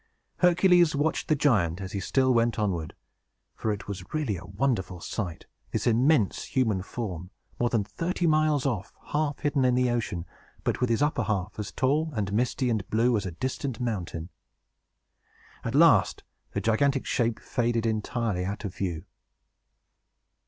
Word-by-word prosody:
Hercules 180 -2 +5
watched 150 +3 0
the 155 - +3
giant, 100 - +2
as 95 -1 -6
he 100 - -3
still 130 +6 +2
went 115 0 +2
onward; 90 -7 -1 0.6
for 110 - -2
it 105 -1 -5
was 100 -2 -5
really 145 -10 0
a 90 - -8
wonderful 95 -3 -1
sight, 85 -1 -5 0.2
this - - -2
immense 120 -1 +3
human 110 -8 +1
form, 90 -4 -5 0.3
more 120 - +2
than 115 -4 +1
thirty 170 - -2
miles 155 -3 +3
off, 110 -8 -2 0.2
half 150 -1 0
hidden 145 -2 +1
in 125 -1 +3
the 125 -1 +2
ocean, 105 -8 -2 0.4
but - - -1
with 125 - +2
his 115 +4 +2
upper 150 - +1
half 100 -2 -1
as 100 -4 -4
tall, 150 +5 +1
and 100 -2 -2
misty, 125 +3 +1
and 110 -5 -1
blue, 115 +2 +3
as 100 -3 -1
a - - -4
distant 130 - -3
mountain. 90 -8 -3 1.3
At - - -3
last - - +5 0.3
the - - -1
gigantic 135 +5 +2
shape 115 -3 0
faded 115 -1 -1
entirely 110 -3 -1
out 100 +4 -4
of 95 - -4
view. 90 -4 -3
115 Hz, 160 wpm, -27 LUFS, 100-135 Hz, 1.3 s, Hercules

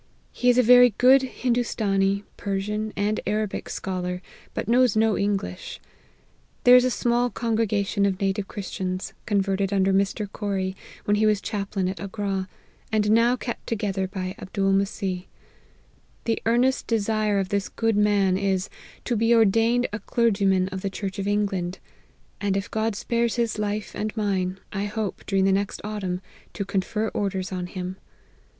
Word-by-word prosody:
He 250 - +1
is 245 - +4
a 250 - +6
very 245 -1 +7
good 260 +2 +7
Hindoostanee, 215 -6 0
Persian, 210 +2 -2
and 210 +1 0
Arabic 210 0 -2
scholar, 180 -1 -3 0.3
but - - -3
knows 245 -1 +4
no 220 -1 +3
English. 200 -2 -2 0.8
There 250 0 +8
is 250 - +7
a 255 - +2
small 240 0 +1
congre 230 -1 0
gation 200 -1 +1
of 190 -1 -2
native 195 0 -1
Christians, 185 -2 -4
converted 195 -1 +1
under 195 -1 +2
Mr. 200 +2 +1
Corrie, 195 -2 -3 0.3
when 205 0 +2
he 215 +1 +3
was 210 -2 +3
chaplain 200 -3 -2
at 185 +1 -4
Agra, 195 -1 -3 0.4
and 210 -1 +2
now 230 +2 +4
kept 240 -1 -6
together 200 -4 -1
by 185 -1 -4
Abdool 195 0 0
Messeeh. 195 -2 -1 1.0
The 230 - 0
earnest 250 +3 +2
de 225 -1 +2
sire 215 0 +1
of 190 -1 -1
this 200 -1 -1
good 225 -1 0
man 200 -3 +3
is, 195 -1 0 0.4
to 240 - 0
be 230 +2 +3
ordained 225 +3 +4
a 210 - -2
clergyman 195 -6 +2
of 190 0 -5
the 195 - -2
church 195 +1 -5
of 195 - -2
England; 195 -3 0 0.6
and 200 -1 +1
if 195 - -4
God 220 -1 0
spares 235 +2 0
his 230 -3 -1
life 210 0 -2
and 215 +2 -4
mine, 190 -3 -1
I 200 0 -1
hope, 210 -1 -4
during 195 -1 +2
the 195 - +4
next 195 +1 0
autumn, 195 -4 -3 0.3
to 200 - -3
confer 205 +3 -1
orders 195 -2 -2
on 180 -1 -3
him. 185 +1 -5
205 Hz, 165 wpm, -25 LUFS, 195-225 Hz, 1.0 s, There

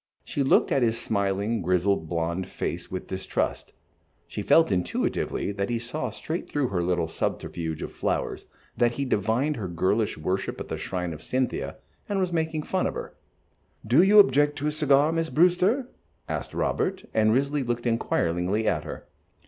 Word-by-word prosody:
She 145 - -3
looked 135 - +3
at 135 - +3
his 115 -1 +2
smiling, 100 +2 0
grizzled, 90 -1 +1
blond 85 +2 -1
face 85 0 -4
with 95 - -5
distrust. 95 0 -2 0.5
She - - -5
felt 165 -8 +4
intuitively 90 +2 -1
that 100 +1 -2
he 120 - 0
saw 120 +7 -3
straight 165 +2 -5
through 145 -4 0
her 90 -3 0
little 85 -1 0
subterfuge 80 0 -3
of - - -5
the - - -21
flowers, - - -2 0.3
that 120 -1 +2
he 140 +3 -2
divined 125 +6 +1
her 100 -4 -3
girlish 95 +5 0
worship 90 +5 -2
at - - -6
the - - -3
shrine 90 -2 -3
of 75 - -9
Cynthia, 130 0 -2 0.3
and 200 -1 0
was 180 -2 0
making 160 -2 -1
fun 185 +3 0
of - - -4
her. - - -6 0.7
"Do 125 +9 +5
you 200 +3 +5
object 145 -5 +6
to 145 - -4
a - - +1
cigar, 150 0 +3
Miss 165 0 -1
Brewster?" 185 - +3 0.4
asked - - -4
Robert, 190 0 -1
and 110 0 +4
Risley 140 +4 +1
looked 120 -1 -2
inquiringly 100 -2 0
at - - +1
her. - - -8
115 Hz, 175 wpm, -26 LUFS, 95-150 Hz, 0.7 s, object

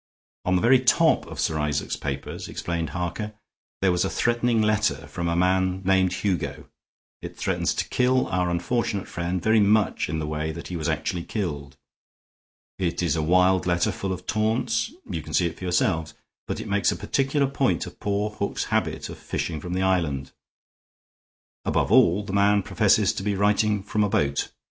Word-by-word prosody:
"On 90 - +2
the 90 - +1
very 125 +2 +6
top - - +3
of - - -8
Sir 80 -1 0
Isaac's 75 -1 -1
papers," - - -5
explained 85 -3 -3
Harker, 90 +6 -4 0.5
"there 95 - +4
was 90 0 +1
a - - 0
threatening 120 -1 +1
letter 105 -6 +1
from 85 +3 -4
a 85 - 0
man 95 +1 +1
named 95 -1 +3
Hugo. 90 0 -2 0.5
It - - -8
threatens - - 0
to - - -2
kill 125 +1 +2
our 90 -1 0
unfortunate 100 +3 -1
friend 85 +1 -3
very 110 0 +4
much 105 -3 +2
in 80 - -2
the 80 - -2
way 75 +1 -2
that 85 - -8
he 90 - -4
was 80 -2 -2
actually 85 -1 -2
killed. 70 - -4 1.0
It 90 -1 -1
is 85 -3 +1
a 80 - 0
wild 90 +3 +3
letter, 85 +4 +2
full 95 0 -4
of 90 0 -5
taunts; 110 +1 0 0.2
you 85 -5 -3
can - - -5
see - - +3
it 85 - -4
for 95 - -6
yourselves; 80 -3 0 0.3
but - - -3
it - - -6
makes 100 0 +2
a - - -2
particular 135 +7 0
point 135 - 0
of - - -11
poor 105 +1 -1
Hook's 100 -1 -2
habit - - 0
of - - -9
fishing 80 -3 -3
from 90 +2 -5
the 95 - 0
island. 80 -8 0 1.3
Above - - 0
all, 95 +5 +5
the 100 -1 -6
man 100 0 +3
professes - - +3
to - - -4
be 100 +1 -1
writing 105 0 +2
from 105 +1 0
a 105 - +1
boat. 70 -6 0
95 Hz, 185 wpm, -25 LUFS, 85-105 Hz, 1.3 s, very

